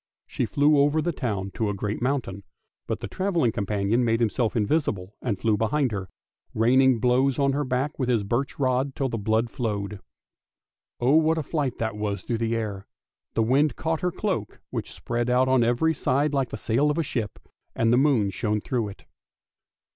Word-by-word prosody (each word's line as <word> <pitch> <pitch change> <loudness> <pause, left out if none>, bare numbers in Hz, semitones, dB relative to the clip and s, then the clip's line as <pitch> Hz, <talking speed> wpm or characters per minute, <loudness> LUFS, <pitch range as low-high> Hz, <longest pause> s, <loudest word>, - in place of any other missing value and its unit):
She - - -2
flew 145 +1 +3
over 145 +2 +3
the 175 +2 0
town 100 - -3
to 110 0 -1
a 100 - -2
great 105 +3 -3
mountain, 125 -7 -1 0.5
but - - -3
the - - -4
travelling 175 - 0
companion 105 +3 0
made 115 -1 +2
himself 115 0 0
invisible 105 - 0
and 110 -6 -1
flew 110 +1 +1
behind 125 +4 +1
her, 95 -3 -4 0.5
raining 125 +2 +4
blows 125 +2 +2
on 140 -1 +2
her 145 +2 0
back 130 +3 -2
with 130 -2 0
his 115 -4 +2
birch 120 +7 -2
rod, 130 0 0
till 135 -1 -1
the 115 - -3
blood 110 +3 0
flowed. 105 -5 -3 1.0
Oh, 130 +6 +4
what 160 0 +3
a 160 - -1
flight 140 -4 -2
that 110 -2 -2
was 105 -1 -3
through 115 -2 -2
the 115 0 0
air; 105 -4 -4 0.5
the 115 - +3
wind 135 +4 +2
caught 160 0 -2
her 180 - 0
cloak, 180 - -3
which - - -4
spread 120 +1 -2
out 125 +1 +3
on 130 -2 +4
every 120 +8 +2
side 140 +1 0
like 135 -3 0
the - - -5
sail 135 +7 +1
of 150 - 0
a 165 - +1
ship, 115 -7 -3 0.4
and 115 +1 +2
the - - +5
moon 130 -8 +3
shone 105 +1 -1
through 115 0 -2
it. 100 - -11
120 Hz, 195 wpm, -25 LUFS, 110-140 Hz, 1.0 s, the